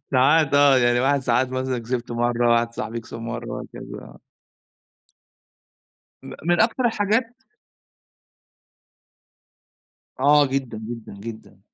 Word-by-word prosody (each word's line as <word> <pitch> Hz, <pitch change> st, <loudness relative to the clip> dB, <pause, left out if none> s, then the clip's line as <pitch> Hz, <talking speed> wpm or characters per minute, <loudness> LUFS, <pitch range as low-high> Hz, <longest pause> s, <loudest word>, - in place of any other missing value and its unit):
ساعات 145 Hz, +3 st, +4 dB
آه، 140 Hz, -2 st, +6 dB
يعني 120 Hz, 0 st, +3 dB
واحد 140 Hz, +2 st, +2 dB
ساعات 125 Hz, 0 st, +1 dB
مثلًا 130 Hz, -1 st, -2 dB
كسبت 120 Hz, +1 st, -4 dB
مرّة، 120 Hz, 0 st, +1 dB
واحد 115 Hz, 0 st, 0 dB
صاحبي 115 Hz, +2 st, -4 dB
كسب 115 Hz, 0 st, -10 dB
مرّة 115 Hz, +1 st, -6 dB
وهكذا -, -, -8 dB
آه. -, -, -15 dB, 2.0 s
م -, -, -9 dB
من 175 Hz, +1 st, +2 dB
أكتر 235 Hz, +3 st, +2 dB
الحاجات 225 Hz, +2 st, 0 dB, 2.8 s
آه 145 Hz, +1 st, +5 dB
جدًا 130 Hz, -4 st, -3 dB
جدًا 115 Hz, 0 st, -8 dB
جدًا. 110 Hz, +2 st, -10 dB
125 Hz, 110 wpm, -23 LUFS, 115-145 Hz, 2.8 s, آه